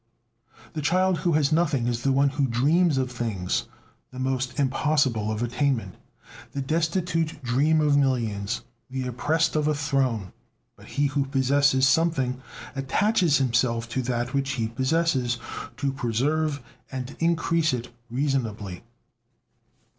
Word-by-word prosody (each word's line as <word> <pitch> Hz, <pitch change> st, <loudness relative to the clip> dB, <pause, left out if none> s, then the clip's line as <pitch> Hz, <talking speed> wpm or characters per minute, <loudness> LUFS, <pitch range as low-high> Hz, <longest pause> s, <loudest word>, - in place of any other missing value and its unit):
The 155 Hz, -, -3 dB
child 180 Hz, +3 st, +2 dB
who 170 Hz, +1 st, +1 dB
has 150 Hz, -1 st, +2 dB
nothing 155 Hz, -6 st, +2 dB
is 120 Hz, -1 st, -1 dB
the 135 Hz, -, +2 dB
one 140 Hz, +1 st, +3 dB
who 140 Hz, -1 st, 0 dB
dreams 145 Hz, +6 st, +3 dB
of 130 Hz, -1 st, 0 dB
things 110 Hz, -7 st, -2 dB, 0.4 s
the 130 Hz, -, -12 dB
most 130 Hz, +1 st, -2 dB
impossible 130 Hz, -5 st, +1 dB
of 110 Hz, +2 st, -2 dB
attainment. 120 Hz, -5 st, 0 dB, 0.6 s
The 140 Hz, -, -2 dB
destitute 165 Hz, 0 st, -1 dB
dream 140 Hz, +6 st, +2 dB
of 150 Hz, -1 st, +3 dB
millions, 120 Hz, -6 st, 0 dB, 0.3 s
the 130 Hz, 0 st, -3 dB
oppressed 155 Hz, +7 st, 0 dB
of 150 Hz, -1 st, +1 dB
a 155 Hz, -, +2 dB
throne. 135 Hz, -9 st, -1 dB, 0.4 s
But -, -, -16 dB
he 145 Hz, -, 0 dB
who 140 Hz, 0 st, 0 dB
possesses 135 Hz, 0 st, +3 dB
something 130 Hz, -4 st, +1 dB, 0.3 s
attaches 155 Hz, +5 st, +2 dB
himself 120 Hz, -2 st, +1 dB
to 130 Hz, +2 st, -1 dB
that 120 Hz, -1 st, -2 dB
which 135 Hz, -1 st, 0 dB
he 115 Hz, -4 st, -1 dB
possesses 130 Hz, -1 st, +1 dB, 0.4 s
to 135 Hz, +1 st, -1 dB
preserve 140 Hz, +4 st, 0 dB, 0.3 s
and 130 Hz, +1 st, -5 dB
increase 165 Hz, -1 st, +2 dB
it 120 Hz, -1 st, -4 dB, 0.2 s
reasonably. 115 Hz, -8 st, -2 dB
135 Hz, 135 wpm, -25 LUFS, 125-150 Hz, 0.6 s, one